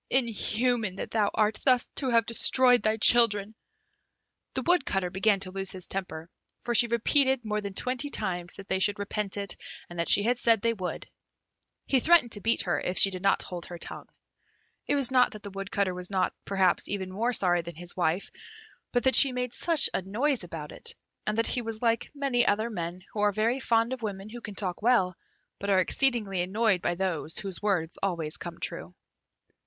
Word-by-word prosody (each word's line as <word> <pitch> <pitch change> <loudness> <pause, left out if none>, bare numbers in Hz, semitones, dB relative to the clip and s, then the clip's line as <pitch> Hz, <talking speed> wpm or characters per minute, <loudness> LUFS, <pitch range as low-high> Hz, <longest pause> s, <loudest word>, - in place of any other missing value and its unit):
Inhuman 235 -3 0
that - - -6
thou 210 -3 +1
art, 215 0 +1
thus 255 -2 +3
to 265 - -1
have 230 -2 +3
destroyed 245 +2 +5
thy 215 0 0
children!" 215 -2 +4 1.0
The - - -2
Woodcutter 230 - +1
began 200 +2 +1
to 185 - -1
lose 195 0 -4
his 185 -1 -4
temper, 170 -4 -6 0.4
for 240 - -2
she 235 +1 +7
repeated 260 +2 +2
more 210 0 -2
than 200 -2 -7
twenty 255 +5 -1
times 180 -8 -4
that 195 - -11
they 190 - -1
should 205 +1 +1
repent 205 0 -3
it, 200 -3 -1 0.4
and 175 - -8
that 170 - 0
she 205 - +6
had 245 +2 0
said 230 -2 +3
they 230 0 +2
would. 185 -5 -6 0.8
He 265 - +2
threatened 320 -4 +4
to 205 - -6
beat 230 +3 +1
her 175 - -1
if 180 - -3
she 195 - +7
did 185 -1 -6
not 195 +1 +1
hold 175 -2 -7
her 175 - -8
tongue. - - -7 0.8
It 290 - +1
was 270 -3 0
not 255 -1 +3
that 215 - -11
the 200 - -8
Woodcutter 195 0 -2
was 180 0 -3
not, 190 -2 0
perhaps, 190 -2 +1
even 190 -2 -4
more 230 +5 0
sorry 180 -6 +2
than 170 -1 -9
his 175 +2 -6
wife, 175 +1 -1 0.6
but 245 - 0
that 265 - +3
she 275 - +8
made 250 -1 -4
such 330 -5 +5
a - - -1
noise 235 +7 -1
about 160 -3 -8
it, 465 +1 -5 0.3
and 215 +1 -1
that 230 - +1
he 245 - 0
was 225 0 -7
like 230 -1 0
many 275 -4 +1
other 220 +2 0
men 175 -2 -6
who 215 - -5
are 205 0 +3
very 225 +6 0
fond 230 -1 +1
of 260 - -7
women 200 -2 -6
who 240 +2 -9
can 210 -3 -8
talk 185 -1 -4
well, 210 -6 +2 0.4
but 200 - -4
are 195 - +3
exceedingly 210 -3 +1
annoyed 195 +1 0
by 175 - -1
those 170 -4 -3
whose 195 -3 -5
words 185 -6 -1
always 170 -5 -2
come 170 -1 -8
true. 85 +3 -5
210 Hz, 205 wpm, -27 LUFS, 185-240 Hz, 1.0 s, she